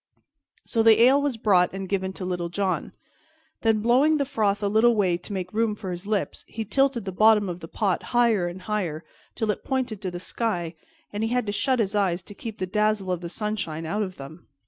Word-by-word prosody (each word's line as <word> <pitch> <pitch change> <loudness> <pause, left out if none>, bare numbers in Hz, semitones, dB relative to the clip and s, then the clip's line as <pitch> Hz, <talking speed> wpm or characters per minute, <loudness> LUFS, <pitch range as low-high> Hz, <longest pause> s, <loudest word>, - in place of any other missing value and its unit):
So 230 - +1
the 225 -1 +6
ale 270 +3 +6
was 285 -5 -1
brought 185 -5 +3
and 195 0 -5
given 190 -1 -1
to 190 - -6
Little 175 -2 -2
John. 190 +1 -1 0.7
Then, 220 -2 +2
blowing 265 +7 +4
the 280 - 0
froth 215 -7 0
a - - +2
little 220 +3 +4
way 190 -5 +2
to 175 - -11
make 185 -1 -4
room 220 -1 +1
for 195 -3 -6
his 175 +3 -6
lips, 210 -2 -2
he 220 -1 -5
tilted 270 0 +1
the 190 - -3
bottom 210 +1 +4
of 175 -1 -5
the 165 - -9
pot 195 +1 -1
higher 230 -7 +3
and 180 +1 -7
higher, 180 -7 -2 0.3
till 220 -2 0
it - - -6
pointed 255 -6 -2
to 190 - -2
the 175 0 -6
sky, 180 -4 -2 0.4
and 205 - -3
he 225 - 0
had 250 0 0
to 205 - -2
shut 260 +5 +1
his 215 -3 0
eyes 190 -4 +1
to 205 - -11
keep 220 +1 -7
the 185 - -2
dazzle 210 0 0
of 180 -1 -2
the 170 - -5
sunshine 200 -6 -3
out 205 +7 -1
of 185 -3 -3
them. 150 +5 -11
205 Hz, 230 wpm, -25 LUFS, 180-225 Hz, 0.7 s, the